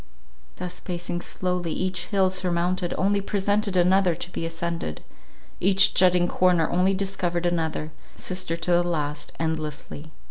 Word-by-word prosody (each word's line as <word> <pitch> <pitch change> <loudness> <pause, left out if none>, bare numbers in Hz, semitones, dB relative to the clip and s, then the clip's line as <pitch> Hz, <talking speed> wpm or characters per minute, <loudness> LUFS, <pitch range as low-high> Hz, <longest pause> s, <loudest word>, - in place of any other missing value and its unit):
Thus 180 0 -6
pacing 175 -1 -4
slowly, 180 -2 -2
each 185 -1 -1
hill 190 -2 +2
surmounted, 180 -1 0
only 200 +1 +2
presented 205 0 0
another 180 0 +4
to 175 - -6
be 165 - -3
ascended; 165 - -4 0.6
each 190 +1 +5
jutting 180 -1 +4
corner 175 -3 +3
only 185 +2 +2
discovered 185 -3 -1
another, 160 -2 -1 0.2
sister 185 -2 -3
to 175 - -1
the 175 0 +4
last, 150 -4 -3
endlessly. 155 -1 -4
175 Hz, 135 wpm, -25 LUFS, 170-185 Hz, 0.6 s, each